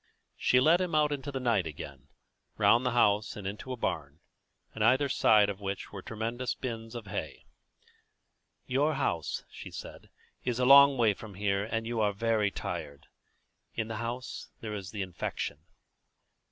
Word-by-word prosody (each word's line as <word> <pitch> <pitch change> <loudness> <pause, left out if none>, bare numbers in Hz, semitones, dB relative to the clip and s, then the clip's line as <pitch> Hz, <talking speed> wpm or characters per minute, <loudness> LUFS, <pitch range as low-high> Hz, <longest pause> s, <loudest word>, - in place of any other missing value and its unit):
She 125 - +3
led 160 +7 +5
him 175 -3 -1
out 150 -1 +3
into 145 0 -3
the 135 - -3
night 115 -9 +1
again, 70 -2 -9 0.5
round 120 +2 +5
the 125 -2 0
house 105 -2 +3
and 105 - -8
into 105 +6 -5
a 130 - -3
barn, 75 -8 -3 0.6
in 110 - -5
either 130 +6 +4
side 105 -5 +5
of 100 -1 -4
which 100 0 -4
were 100 - -7
tremendous 115 +4 -3
bins 115 -2 -6
of 115 -2 -6
hay. 100 0 -5 1.2
"Your 145 +4 +1
house," 105 - -1
she - - -9
said, - - -9 0.3
"is 120 -2 -1
a 125 - +2
long 140 +1 +8
way 115 -3 +4
from 100 0 -11
here, 100 0 0
and 115 0 -2
you 115 -1 -1
are 105 -1 +2
very 110 0 +1
tired. 70 -6 -6 0.7
In 110 0 -2
the 110 - -3
house 120 +3 -5
here 110 - -6
there - - -3
is 95 -2 -6
the 105 -2 -3
infection." 90 -4 -4
115 Hz, 175 wpm, -30 LUFS, 100-125 Hz, 1.2 s, long